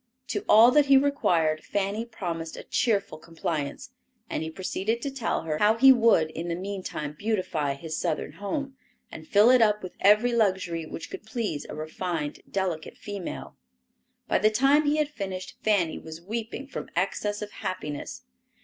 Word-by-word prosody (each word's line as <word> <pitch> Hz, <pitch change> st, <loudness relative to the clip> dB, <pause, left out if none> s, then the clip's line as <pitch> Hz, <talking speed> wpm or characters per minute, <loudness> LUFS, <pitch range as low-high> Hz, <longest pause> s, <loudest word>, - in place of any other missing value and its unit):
To 205 Hz, -, -2 dB
all 225 Hz, +3 st, +8 dB
that 295 Hz, +1 st, +4 dB
he 275 Hz, -1 st, +7 dB
required 170 Hz, -, +2 dB
Fanny 205 Hz, +3 st, -2 dB
promised 170 Hz, -8 st, -5 dB
a -, -, -7 dB
cheerful 205 Hz, -8 st, 0 dB
compliance, 165 Hz, -, -4 dB, 0.4 s
and -, -, -1 dB
he 160 Hz, -, -3 dB
proceeded 190 Hz, +6 st, -2 dB
to 280 Hz, -, -2 dB
tell 265 Hz, -10 st, -2 dB
her 155 Hz, -1 st, -2 dB
how 215 Hz, +2 st, +4 dB
he 265 Hz, +3 st, +8 dB
would 225 Hz, -10 st, +4 dB
in 165 Hz, +2 st, -5 dB
the 170 Hz, -, -1 dB
meantime 185 Hz, -5 st, -5 dB
beautify 160 Hz, -7 st, -1 dB
his 155 Hz, +3 st, -6 dB
Southern 155 Hz, -, -2 dB
home, 270 Hz, +7 st, -4 dB, 0.4 s
and 160 Hz, 0 st, -10 dB
fill 210 Hz, +4 st, +6 dB
it 255 Hz, -2 st, +6 dB
up 210 Hz, -2 st, +3 dB
with 185 Hz, -, -7 dB
every 210 Hz, +5 st, +5 dB
luxury 185 Hz, -7 st, 0 dB
which -, -, -8 dB
could -, -, -7 dB
please 220 Hz, -, -3 dB
a -, -, -6 dB
refined, 155 Hz, -1 st, -4 dB
delicate 185 Hz, -5 st, -3 dB
female. 200 Hz, -3 st, -6 dB, 0.7 s
By -, -, +2 dB
the 215 Hz, +2 st, +4 dB
time 275 Hz, +7 st, +4 dB
he 295 Hz, +1 st, +2 dB
had 305 Hz, -1 st, +2 dB
finished 190 Hz, -9 st, -6 dB
Fanny 195 Hz, -7 st, +1 dB
was 160 Hz, 0 st, -9 dB
weeping 225 Hz, +8 st, -5 dB
from 275 Hz, -, -7 dB
excess 205 Hz, +3 st, -1 dB
of 205 Hz, -, -7 dB
happiness. 150 Hz, -5 st, -5 dB
200 Hz, 170 wpm, -27 LUFS, 165-230 Hz, 0.7 s, all